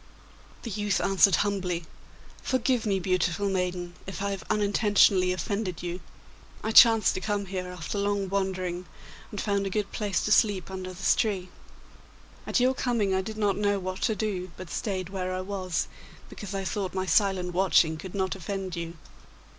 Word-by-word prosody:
The 230 Hz, -, -5 dB
youth 205 Hz, 0 st, 0 dB
answered 195 Hz, 0 st, +4 dB
humbly: 180 Hz, -4 st, -2 dB, 0.6 s
'Forgive 255 Hz, -2 st, +1 dB
me, 195 Hz, -2 st, +2 dB
beautiful 185 Hz, +2 st, 0 dB
maiden, 180 Hz, -2 st, -2 dB
if 190 Hz, -, -6 dB
I 200 Hz, -, 0 dB
have 195 Hz, -, -4 dB
unintentionally 205 Hz, -3 st, +4 dB
offended 185 Hz, 0 st, -3 dB
you. 175 Hz, +1 st, -3 dB, 0.6 s
I 220 Hz, -, -1 dB
chanced 225 Hz, -3 st, +7 dB
to 185 Hz, -, -4 dB
come 205 Hz, 0 st, -1 dB
here 185 Hz, -1 st, -4 dB
after 180 Hz, +2 st, -4 dB
long 200 Hz, -1 st, 0 dB
wandering, 185 Hz, -2 st, -2 dB, 0.4 s
and 205 Hz, -, -6 dB
found 200 Hz, -1 st, 0 dB
a -, -, -2 dB
good 205 Hz, 0 st, -2 dB
place 205 Hz, -5 st, -1 dB
to 210 Hz, -, -1 dB
sleep 200 Hz, -3 st, +3 dB
under 185 Hz, -1 st, -5 dB
this 185 Hz, +1 st, +2 dB
tree. 190 Hz, -5 st, -1 dB, 1.0 s
At -, -, +2 dB
your 255 Hz, +1 st, +4 dB
coming 235 Hz, -7 st, 0 dB
I 190 Hz, -, +2 dB
did 215 Hz, +3 st, -7 dB
not 205 Hz, -2 st, +1 dB
know 205 Hz, -1 st, +1 dB
what 185 Hz, 0 st, -5 dB
to 220 Hz, -, +1 dB
do, 190 Hz, -3 st, -2 dB
but 185 Hz, -3 st, -9 dB
stayed 185 Hz, -4 st, -3 dB
where 185 Hz, -1 st, -3 dB
I 185 Hz, -, -2 dB
was, 185 Hz, -3 st, -2 dB, 0.4 s
because 200 Hz, -1 st, -7 dB
I 195 Hz, -, -2 dB
thought 190 Hz, -1 st, -3 dB
my 185 Hz, 0 st, -1 dB
silent 190 Hz, -2 st, +2 dB
watching 175 Hz, -3 st, +4 dB
could 180 Hz, +4 st, -8 dB
not 190 Hz, -1 st, 0 dB
offend 195 Hz, -1 st, -4 dB
you. 170 Hz, 0 st, -5 dB
195 Hz, 175 wpm, -27 LUFS, 185-205 Hz, 1.0 s, chanced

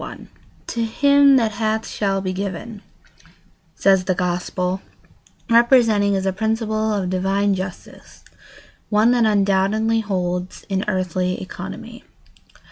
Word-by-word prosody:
] -, -, -31 dB
"To 235 Hz, -, -1 dB
him 280 Hz, +4 st, +4 dB
that 230 Hz, -4 st, +2 dB
hath 220 Hz, +1 st, -1 dB
shall 195 Hz, -2 st, -1 dB
be 185 Hz, -1 st, -3 dB
given," 200 Hz, +3 st, -5 dB, 0.9 s
says 190 Hz, -2 st, +3 dB
the 185 Hz, -, 0 dB
Gospel, 180 Hz, +1 st, -2 dB, 0.7 s
representing 230 Hz, -4 st, +4 dB
as 190 Hz, 0 st, -2 dB
a 190 Hz, -, 0 dB
principle 220 Hz, +1 st, -1 dB
of 195 Hz, -3 st, -2 dB
divine 195 Hz, +2 st, +1 dB
justice 185 Hz, -1 st, -8 dB, 0.7 s
one 215 Hz, +2 st, +3 dB
that 240 Hz, -2 st, +3 dB
undoubtedly 205 Hz, +2 st, +2 dB
holds 180 Hz, -3 st, -3 dB
in 190 Hz, 0 st, -1 dB
earthly 185 Hz, -2 st, -1 dB
economy. 190 Hz, -, -8 dB
200 Hz, 120 wpm, -21 LUFS, 185-220 Hz, 0.9 s, him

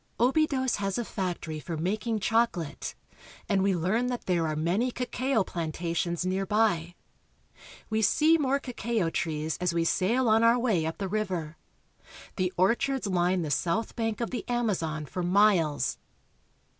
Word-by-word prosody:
Obidos 260 Hz, 0 st, +2 dB
has 195 Hz, -1 st, -2 dB
a 240 Hz, -, -2 dB
factory 175 Hz, -6 st, -4 dB
for 165 Hz, +1 st, -5 dB
making 215 Hz, +7 st, -1 dB
chocolate, 215 Hz, -8 st, 0 dB, 0.5 s
and 200 Hz, -2 st, +2 dB
we 195 Hz, -1 st, +2 dB
learn 190 Hz, +9 st, 0 dB
that 245 Hz, -1 st, -4 dB
there 170 Hz, -3 st, +1 dB
are 155 Hz, -, -2 dB
many 175 Hz, +11 st, +1 dB
cacao 250 Hz, -1 st, 0 dB
plantations 170 Hz, 0 st, -2 dB
near 190 Hz, +1 st, 0 dB
by. 190 Hz, -4 st, +1 dB, 1.0 s
We 220 Hz, 0 st, +1 dB
see 310 Hz, +10 st, +4 dB
more 275 Hz, -1 st, +2 dB
cacao 230 Hz, -8 st, -2 dB
trees 155 Hz, -1 st, -2 dB
as 180 Hz, -1 st, 0 dB
we 170 Hz, -, +2 dB
sail 230 Hz, +9 st, +1 dB
on 220 Hz, 0 st, +4 dB
our 230 Hz, +1 st, +5 dB
way 215 Hz, -10 st, +1 dB
up 160 Hz, -, -4 dB
the 195 Hz, -, -3 dB
river. 185 Hz, -6 st, -2 dB, 0.8 s
The 185 Hz, -2 st, 0 dB
orchards 235 Hz, +7 st, +1 dB
line 180 Hz, -1 st, +1 dB
the 150 Hz, -, -3 dB
south 180 Hz, +9 st, 0 dB
bank 225 Hz, -1 st, -2 dB
of 235 Hz, -, -2 dB
the 245 Hz, -4 st, -3 dB
Amazon 180 Hz, -11 st, -1 dB
for 180 Hz, +5 st, -5 dB
miles. 180 Hz, -5 st, +2 dB
195 Hz, 155 wpm, -28 LUFS, 170-230 Hz, 1.0 s, our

